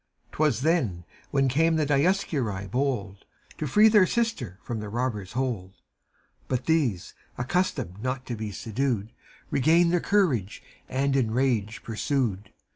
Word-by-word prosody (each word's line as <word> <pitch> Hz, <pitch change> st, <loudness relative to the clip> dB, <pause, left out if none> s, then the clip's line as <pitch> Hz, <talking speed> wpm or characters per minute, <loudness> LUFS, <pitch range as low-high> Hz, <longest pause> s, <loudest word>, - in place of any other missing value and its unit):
'T -, -, -13 dB
was 145 Hz, -7 st, +2 dB
then, 130 Hz, -, +1 dB, 0.3 s
when 135 Hz, -1 st, +2 dB
came 160 Hz, +5 st, +2 dB
the 155 Hz, -1 st, +1 dB
Dioscuri 140 Hz, -, +1 dB
bold 120 Hz, -7 st, -2 dB, 0.4 s
To 155 Hz, -, -2 dB
free 210 Hz, +10 st, +6 dB
their 210 Hz, -4 st, +6 dB
sister 230 Hz, -, -1 dB
from 120 Hz, -3 st, -4 dB
the 105 Hz, -1 st, -6 dB
robbers' 110 Hz, -4 st, -3 dB
hold; 120 Hz, -8 st, -2 dB, 0.7 s
But 130 Hz, -1 st, -2 dB
these, 140 Hz, -, 0 dB, 0.2 s
accustomed 120 Hz, -, -1 dB
not 130 Hz, +1 st, -3 dB
to 120 Hz, -, -4 dB
be 110 Hz, -1 st, -5 dB
subdued. 115 Hz, +1 st, -2 dB, 0.4 s
Regained 170 Hz, +5 st, +4 dB
their 175 Hz, -, +4 dB
courage 150 Hz, -, +1 dB, 0.3 s
and 135 Hz, +1 st, 0 dB
in 125 Hz, -5 st, +2 dB
rage 115 Hz, -3 st, 0 dB
pursued. 110 Hz, -4 st, -2 dB
130 Hz, 140 wpm, -26 LUFS, 105-155 Hz, 0.7 s, free